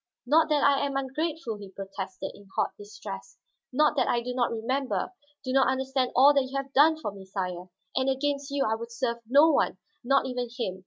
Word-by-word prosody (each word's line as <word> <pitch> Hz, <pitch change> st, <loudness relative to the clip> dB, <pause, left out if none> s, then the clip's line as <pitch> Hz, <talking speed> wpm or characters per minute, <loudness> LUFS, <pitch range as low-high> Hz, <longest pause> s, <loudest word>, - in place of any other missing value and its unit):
"Not 315 Hz, +5 st, +4 dB
that 295 Hz, -2 st, +2 dB
I 280 Hz, 0 st, +4 dB
am 280 Hz, -1 st, -1 dB
ungrateful," 275 Hz, -2 st, -3 dB
he 200 Hz, -1 st, -10 dB
protested 190 Hz, -1 st, -6 dB
in 200 Hz, -, -16 dB
hot -, -, +1 dB
distress. 205 Hz, -, -9 dB, 0.3 s
"Not 300 Hz, +3 st, +3 dB
that -, -, +3 dB
I 240 Hz, -, +2 dB
do 250 Hz, +1 st, -3 dB
not 245 Hz, -1 st, +1 dB
remember, 255 Hz, +9 st, -2 dB, 0.3 s
do 255 Hz, -, -3 dB
not 270 Hz, 0 st, +4 dB
understand 265 Hz, -1 st, 0 dB
all 275 Hz, +3 st, +7 dB
that 275 Hz, -2 st, +2 dB
you 275 Hz, -, -3 dB
have 275 Hz, 0 st, -5 dB
done 310 Hz, +3 st, +6 dB
for 210 Hz, -, -3 dB
me, 195 Hz, -1 st, -11 dB
sire. 185 Hz, -2 st, -5 dB, 0.3 s
And 265 Hz, +1 st, +1 dB
against 280 Hz, +1 st, -1 dB
you 280 Hz, 0 st, 0 dB
I 220 Hz, -, +1 dB
would 230 Hz, +1 st, -5 dB
serve 235 Hz, 0 st, -1 dB
no 290 Hz, +5 st, +6 dB
one, -, -, +1 dB, 0.3 s
not 275 Hz, +2 st, +3 dB
even 250 Hz, -2 st, -3 dB
him. 190 Hz, -6 st, -3 dB
260 Hz, 210 wpm, -27 LUFS, 220-280 Hz, 0.3 s, all